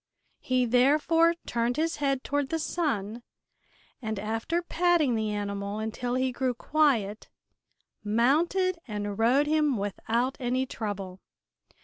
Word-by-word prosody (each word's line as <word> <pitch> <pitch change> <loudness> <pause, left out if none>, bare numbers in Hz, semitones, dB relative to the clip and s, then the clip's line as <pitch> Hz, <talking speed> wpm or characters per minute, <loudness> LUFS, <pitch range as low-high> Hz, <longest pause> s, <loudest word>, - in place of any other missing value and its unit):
He 255 -1 +1
therefore 300 +7 +4
turned 235 +2 -1
his 325 +1 0
head 275 -2 0
toward 285 -1 -1
the 325 - 0
sun 245 - -2 0.8
and 220 -2 -3
after 225 - -2
patting 345 -6 +2
the 220 -1 -1
animal 200 0 -3
until 230 +3 -3
he 260 0 +1
grew 250 0 -1
quiet 235 -8 +1 0.7
mounted 320 - +2
and 205 -1 -4
rode 255 +6 +4
him 300 -4 +2
without 225 +6 -1
any 255 +1 0
trouble. 200 -6 -5
250 Hz, 120 wpm, -28 LUFS, 215-300 Hz, 0.8 s, therefore